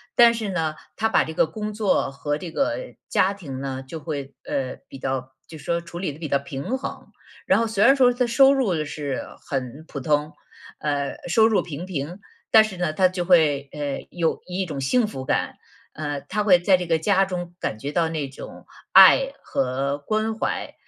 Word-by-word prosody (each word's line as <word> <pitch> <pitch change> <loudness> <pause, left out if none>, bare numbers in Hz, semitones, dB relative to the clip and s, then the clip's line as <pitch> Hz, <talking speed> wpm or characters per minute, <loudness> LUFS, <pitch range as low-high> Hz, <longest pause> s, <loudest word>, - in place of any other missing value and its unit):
但 235 -1 +7
是 220 -3 -3
呢， 160 -4 -1 0.2
他 220 - +1
把 225 - +3
这 160 - -6
个 - - +4
工 215 +4 -5
作 210 -8 +1
和 145 +2 -3
这 175 - -6
个 280 - -2
家 190 - +3
庭 140 -9 -7
呢， 135 -1 -4
就 160 +3 -6
会 140 -3 -5
呃， 130 -2 -3
比 135 - -10
较 130 -1 -3 0.2
就 160 -2 -10
说 170 +4 -1
处 170 0 -9
理 180 -6 -2
地 - - -13
比 160 -1 -5
较 140 -1 +1
平 140 - -4
衡。 - - -7 0.4
然 - - +4
后 230 - +1
虽 210 -2 +1
然 270 - +7
说 255 -2 +5
他 245 +1 0
收 270 +3 +5
入 190 - +1
是 145 -2 -4 0.2
很 135 +2 -4
普 140 - -6
通， 150 +2 0 0.5
呃 145 -2 -1
收 220 +5 +5
入 220 - +2
平 170 +1 -6
平， 175 +1 -5 0.3
但 220 -1 +8
是 215 -4 -6
呢， 175 -3 0
他 185 +4 +4
就 180 -1 -3
会， 150 -6 +3
呃， 145 -2 -4
有 170 -2 -1
一 185 +1 -2
种 145 -4 -5
幸 225 - +2
福 135 -10 -6
感。 - - -1 0.4
呃， 145 -2 -4
他 210 +8 -2
会 190 -4 +6
在 180 +2 +4
这 180 -1 -3
个 165 -1 +3
家 195 +3 +3
中 175 -2 -4
感 110 - -3
觉 140 +6 -5
到 165 +1 +1
那 155 -3 -3
种 135 - -11 0.3
爱 - - +8
和 135 +2 -1
关 215 +7 -1
怀， - - -3
165 Hz, 220 characters per minute, -23 LUFS, 140-205 Hz, 0.5 s, 但